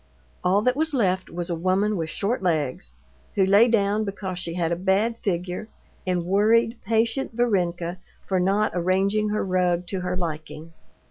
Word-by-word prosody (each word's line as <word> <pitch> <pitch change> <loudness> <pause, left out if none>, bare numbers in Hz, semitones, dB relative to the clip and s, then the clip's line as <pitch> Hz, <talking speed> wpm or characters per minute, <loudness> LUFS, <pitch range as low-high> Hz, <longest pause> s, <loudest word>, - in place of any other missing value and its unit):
All 195 +3 +3
that 250 +2 +2
was 315 0 0
left 185 -6 +1
was 175 +1 -4
a - - 0
woman 190 +5 +1
with 165 -3 -3
short 210 +8 -1
legs, 145 - -1 0.4
who 195 - +4
lay 200 +5 +6
down 210 -2 +2
because 195 -3 -4
she 170 -2 -5
had 170 -2 0
a - - +2
bad 200 +6 +1
figure, 180 0 -3 0.4
and 180 -2 0
worried 225 +5 +3
patient 225 +4 0
Varenka 180 -6 0 0.3
for 190 -1 0
not 200 +4 +2
arranging 195 +4 +1
her 210 -1 -1
rug 180 -1 +1
to 190 +2 -3
her 180 0 -2
liking. 160 -1 -5
190 Hz, 165 wpm, -24 LUFS, 175-215 Hz, 0.4 s, lay